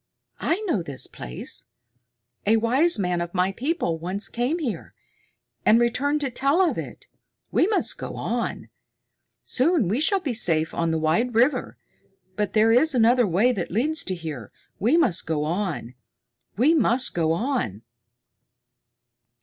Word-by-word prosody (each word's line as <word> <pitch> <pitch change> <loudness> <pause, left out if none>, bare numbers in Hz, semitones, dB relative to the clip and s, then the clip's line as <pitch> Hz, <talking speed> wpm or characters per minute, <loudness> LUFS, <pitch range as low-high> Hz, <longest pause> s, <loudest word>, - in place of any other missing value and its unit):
I 350 +6 0
know 335 - -1
this 140 -5 -3
place. - - -5 0.8
A 225 +2 +5
wise 260 +9 +2
man 180 -3 -1
of 175 +2 -5
my 185 +1 +2
people 240 - -2
once 185 +5 -4
came 245 +7 -1
here, 275 -10 -5 0.7
and 225 - +5
returned 280 +5 +1
to 275 -3 -2
tell 275 +7 +1
of 370 -3 +3
it. - - -7 0.5
We 345 - +3
must 425 - 0
go - - -6
on. - - -3 0.7
Soon 275 - +1
we 215 +8 0
shall 390 +6 +3
be 290 -9 -3
safe 165 -8 +2
on 170 0 -1
the 160 - 0
wide 195 +10 0
river. 250 +6 +1 0.6
But 210 -1 -2
there 220 +1 +4
is 265 +5 +4
another 240 0 +4
way 200 +8 +3
that 195 -8 -3
leads 295 - 0
to 185 - -1
here. 155 - -7 0.3
We 245 - +3
must 200 - +1
go 155 -2 -1
on! 165 - -3 0.6
We 275 +9 +4
must 260 -4 +2
go 165 -2 +1
on!" 210 - -2
225 Hz, 150 wpm, -24 LUFS, 175-275 Hz, 0.8 s, A